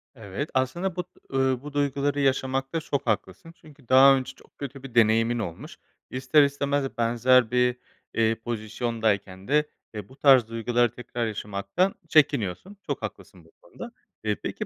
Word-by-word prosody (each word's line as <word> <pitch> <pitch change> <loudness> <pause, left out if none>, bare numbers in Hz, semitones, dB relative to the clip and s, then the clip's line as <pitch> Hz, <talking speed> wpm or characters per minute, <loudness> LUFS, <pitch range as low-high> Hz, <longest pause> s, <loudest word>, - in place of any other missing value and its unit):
Evet, 110 +6 -5
aslında 170 +8 -1
bu, 180 - -2 0.3
eee, 135 - +1 0.2
bu 145 0 -9
duyguları 145 0 0
yaşamakta 135 +2 0
çok 140 -4 -3
haklısın 110 - -3
çünkü 145 -5 -18
daha 135 +1 +8
önce 130 -1 -4
çok - - -23
kötü 135 -1 -7
bir 125 -3 -10
deneyimin 115 +1 +3
olmuş. 110 - -7 0.3
İster 130 +3 +3
istemez 140 -1 -1
benzer 120 +1 +3
bir, 125 0 +2 0.4
eee, 115 0 +2
pozisyondayken 110 -4 -3
de, 150 +1 +2 0.3
e, 105 -2 -7
bu 130 - -15
tarz 135 -5 +5
duyguları 120 0 0
tekrar 120 -1 -4
yaşamaktan 105 - -2
çekiniyorsun. 145 - +1
Çok - - -3
haklısın - - -8
bu - - -22
konuda. 245 - -10 0.3
Eee, - - 0
peki, - - -4
130 Hz, 150 wpm, -26 LUFS, 115-140 Hz, 0.4 s, daha